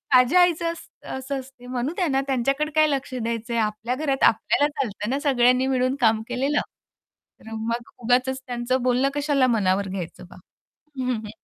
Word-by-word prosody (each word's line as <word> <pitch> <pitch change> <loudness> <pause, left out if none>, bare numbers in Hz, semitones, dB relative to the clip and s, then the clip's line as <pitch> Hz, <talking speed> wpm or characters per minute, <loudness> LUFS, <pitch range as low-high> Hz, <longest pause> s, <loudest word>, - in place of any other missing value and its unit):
माझ्या 255 +9 +6
आईचं 340 -1 +2
असं 330 0 -13
असं 265 +1 -4
असते 255 -1 -13
म्हणू 255 +5 -2
त्यांना 280 -8 +1
त्यांच्याकडे 275 +4 0
काय 310 0 +5
लक्ष 270 -1 -2
द्यायचंय 235 0 -3
आपल्या 215 +3 -1
घरात 275 -2 -1
आपल्याला 285 +6 +3
चालत 210 -4 -4
ना 275 +2 0
सगळ्यांनी 255 -1 +3
मिळून 255 0 +1
काम 220 -1 +4
केलेलं. 275 +4 +1 0.8
तर 225 - -12
मग 230 +2 -3
उगाचच 255 +2 +1
त्यांचं 245 +1 -1
बोलणं 255 +2 +2
कशाला 285 -3 +2
मनावर 200 -4 +1
घ्यायचं 185 -2 -6
बा. - - -14 0.6
हं, 255 0 0
हं. 215 -2 -6
255 Hz, 165 wpm, -24 LUFS, 235-275 Hz, 0.8 s, माझ्या